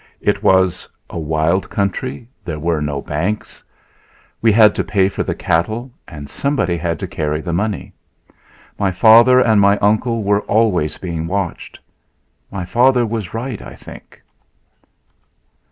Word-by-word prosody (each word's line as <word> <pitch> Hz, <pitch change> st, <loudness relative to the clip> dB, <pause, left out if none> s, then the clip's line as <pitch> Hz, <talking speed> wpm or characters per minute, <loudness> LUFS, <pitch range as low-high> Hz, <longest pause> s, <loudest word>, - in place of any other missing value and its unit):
It -, -, 0 dB
was 95 Hz, -1 st, +2 dB, 0.2 s
a -, -, -5 dB
wild 80 Hz, +4 st, 0 dB
country. 100 Hz, -3 st, -3 dB, 0.2 s
There 80 Hz, -4 st, -5 dB
were 80 Hz, 0 st, -1 dB
no 75 Hz, -2 st, -3 dB
banks. 90 Hz, +9 st, -4 dB, 0.8 s
We 115 Hz, -, +4 dB
had 105 Hz, -1 st, +6 dB
to -, -, -1 dB
pay 95 Hz, -1 st, +1 dB
for -, -, -4 dB
the -, -, -2 dB
cattle, 110 Hz, +10 st, -1 dB, 0.2 s
and 75 Hz, -3 st, -9 dB
somebody 90 Hz, -, -1 dB
had 85 Hz, -1 st, -2 dB
to -, -, -3 dB
carry 75 Hz, 0 st, -2 dB
the 85 Hz, +1 st, -4 dB
money. 100 Hz, +2 st, -2 dB, 0.9 s
My 100 Hz, -2 st, +1 dB
father 115 Hz, +6 st, +6 dB
and 110 Hz, -5 st, +4 dB
my 100 Hz, +1 st, +4 dB
uncle 110 Hz, +3 st, +1 dB
were 100 Hz, +1 st, +2 dB
always 100 Hz, -8 st, +1 dB
being 85 Hz, -3 st, -4 dB
watched. 95 Hz, -1 st, -4 dB, 0.7 s
My 95 Hz, -3 st, -5 dB
father 125 Hz, +5 st, +3 dB
was 110 Hz, -3 st, -4 dB
right, 120 Hz, -1 st, -4 dB
I -, -, -10 dB
think. -, -, -14 dB
100 Hz, 145 wpm, -18 LUFS, 85-110 Hz, 0.9 s, had